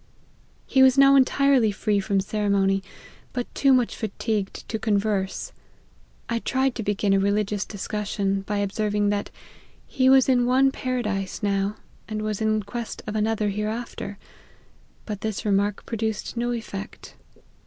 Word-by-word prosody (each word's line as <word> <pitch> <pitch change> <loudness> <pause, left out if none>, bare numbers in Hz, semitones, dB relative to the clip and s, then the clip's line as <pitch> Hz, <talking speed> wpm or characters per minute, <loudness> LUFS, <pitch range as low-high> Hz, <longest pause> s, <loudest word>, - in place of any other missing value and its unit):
He 265 - +3
was 265 0 +6
now 275 0 +7
entirely 270 -3 +4
free 205 0 0
from 195 0 +1
ceremony, 200 -1 +1 0.5
but 245 -1 -4
too 275 - +3
much 250 -3 +3
fatigued 215 -1 -3
to 220 - -3
con 215 -2 +1
verse. 200 -2 -2 0.8
I 235 -1 -1
tried 265 +2 0
to 230 - -4
begin 205 -1 +1
a 195 - +4
religious 205 0 0
discussion, 200 -1 -2
by 205 +1 -3
observing 205 +1 0
that' 205 0 -1
4 - - -30 0.5
he 260 0 +2
was 265 -1 +6
in 245 -2 +3
one 265 +2 +4
paradise 215 -8 -3
now, 200 0 0 0.3
and 215 0 -4
was 215 0 -2
in 215 -1 +1
quest 230 +3 -6
of 215 - -5
another 215 0 +1
hereafter,' 210 0 -4 0.9
but 210 -2 -5
this 220 -1 -3
remark 200 0 +1
produced 220 -1 -3
no 240 +1 -1
effect." 215 -4 -6
215 Hz, 150 wpm, -24 LUFS, 200-240 Hz, 0.9 s, now